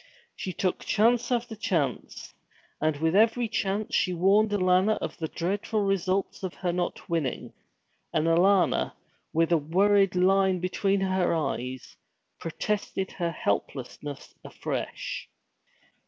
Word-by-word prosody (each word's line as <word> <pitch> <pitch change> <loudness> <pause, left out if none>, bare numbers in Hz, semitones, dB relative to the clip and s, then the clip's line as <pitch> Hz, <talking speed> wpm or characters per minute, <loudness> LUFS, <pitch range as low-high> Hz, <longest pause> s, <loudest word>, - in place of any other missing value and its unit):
She 185 - -4
took 185 +1 -1
chance 235 +3 +2
after 235 -2 -1
chance. 160 - -2 0.5
And 155 -1 +1
with 160 +3 +1
every 225 +3 +4
chance 205 -1 -2
she 180 - +2
warned 200 +5 +4
Alanna 190 +1 +3
of 155 - -4
the 160 - -2
dreadful 200 +6 -2
results 195 -1 0
of 185 -2 -5
her 175 -2 -2
not 175 0 -3
winning; 165 -6 -2 0.6
and 155 - +1
Alanna, 180 +3 +3 0.4
with 165 +1 +1
a 170 - +4
worried 195 +5 +3
line 190 0 +3
between 195 +2 0
her 185 -2 +1
eyes, 130 -5 -3 0.4
protested 190 +3 -3
her 170 -2 -2
helplessness 140 +1 -4
afresh. - - -5
185 Hz, 125 wpm, -27 LUFS, 165-200 Hz, 0.6 s, every